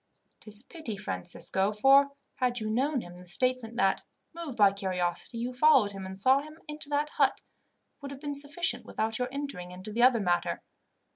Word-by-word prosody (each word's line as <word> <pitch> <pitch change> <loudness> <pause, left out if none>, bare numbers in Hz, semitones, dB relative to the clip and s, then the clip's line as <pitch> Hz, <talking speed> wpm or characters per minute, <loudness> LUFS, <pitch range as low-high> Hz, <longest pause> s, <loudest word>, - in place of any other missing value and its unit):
"It - - -17
is 210 -1 -7
a - - -25
pity, 280 - -6
Francisco, 190 - +1
for 275 +6 +5 0.2
had 250 -2 0
you 215 0 -3
known 265 +3 0
him, 175 -2 -11
the 180 - -14
statement 250 +4 0
that, 195 -5 +2 0.3
moved 330 -6 -7
by 205 -2 +6
curiosity, 185 +2 -2
you 245 +2 -3
followed 260 -6 +4
him 195 -1 -7
and 190 0 -7
saw 260 +6 +4
him 305 +1 -12
into 300 -1 -7
that 295 +1 0
hut, - - +1 0.6
would 280 - -7
have 275 -1 -9
been 290 -1 -3
sufficient 285 +4 +1
without 225 +1 -3
your 250 0 -1
entering 275 -11 -5
into 185 +3 -8
the 235 - 0
other 250 -1 +6
matter. 175 -3 -1
240 Hz, 195 wpm, -29 LUFS, 195-280 Hz, 0.6 s, by